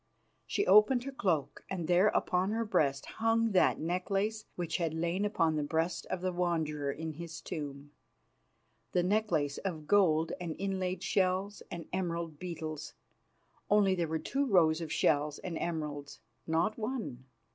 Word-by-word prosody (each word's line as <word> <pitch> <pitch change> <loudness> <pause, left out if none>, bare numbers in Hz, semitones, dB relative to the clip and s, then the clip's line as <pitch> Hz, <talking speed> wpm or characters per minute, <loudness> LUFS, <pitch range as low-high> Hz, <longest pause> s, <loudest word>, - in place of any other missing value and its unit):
She 405 - 0
opened 240 +4 +6
her 275 - -5
cloak, 165 - -1
and 175 -4 -3
there 180 +3 +5
upon 185 -2 +1
her 225 +2 0
breast 140 -9 +1
hung 225 0 +1
that 190 - +4
necklace 195 +6 -1
which 170 -2 -2
had 165 -2 -1
lain 170 +5 0
upon 165 -6 +1
the - - +1
breast 165 +3 -1
of 185 - -3
the 185 0 0
Wanderer 160 -5 0
in 160 +2 -5
his 165 +1 -7
tomb, 145 -3 -6 1.0
the 180 - +3
necklace 180 -8 +1
of 165 -6 -4
gold 165 -4 +3
and 170 -3 -3
inlaid 190 -2 -2
shells 190 +1 0
and 170 -4 -6
emerald 170 -4 -2
beetles, 160 -4 -5 0.7
only 205 -2 +5
there 175 -3 0
were 160 +1 -1
two 275 - -1
rows 170 -6 +4
of 160 -2 -5
shells 150 -1 +2
and 175 -3 -5
emeralds, 150 -4 -4 0.3
not 165 +8 +1
one. 215 - -4
175 Hz, 155 wpm, -32 LUFS, 155-195 Hz, 1.0 s, opened